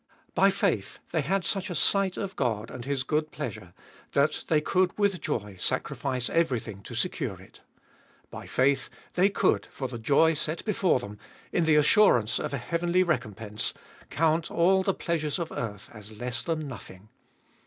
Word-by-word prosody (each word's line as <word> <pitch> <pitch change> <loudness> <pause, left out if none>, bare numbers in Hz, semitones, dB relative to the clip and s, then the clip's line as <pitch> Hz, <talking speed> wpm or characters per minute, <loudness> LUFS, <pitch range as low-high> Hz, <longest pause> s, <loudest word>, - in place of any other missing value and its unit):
By 195 - +5
faith 190 - 0
they 160 - +1
had 185 +5 0
such 195 +1 0
a 175 - -3
sight 195 +2 +2
of 195 -1 -4
God 115 -4 -1
and 120 -2 -7
His 135 -1 -1
good 155 +2 0
pleasure, - - -6 0.4
that 140 +2 +1
they 155 - +3
could 180 +4 +1
with 200 -5 +1
joy 105 -7 -3
sacrifice 130 +6 -1
everything 125 - 0
to - - -9
secure - - -2
it. - - -17 0.7
By - - -8
faith 135 +1 +2 0.2
they 185 +3 +4
could, 200 -1 +1
for 130 - -5
the 120 -2 -7
joy 145 +8 +4
set 155 +2 -2
before 195 - +2
them, 105 -4 -9 0.3
in 170 - +2
the 160 -1 +4
assurance 150 - +4
of - - -3
a 140 - -1
heavenly 170 +6 +1
recompense, 110 - -2 0.3
count 160 +1 +1
all 190 +3 +3
the 190 0 0
pleasures 155 -3 -1
of 170 -2 -4
earth 105 -3 -5
as 110 -1 -11
less 120 0 -3
than 155 -2 -2
nothing. 105 -5 -10
150 Hz, 170 wpm, -28 LUFS, 120-175 Hz, 0.7 s, By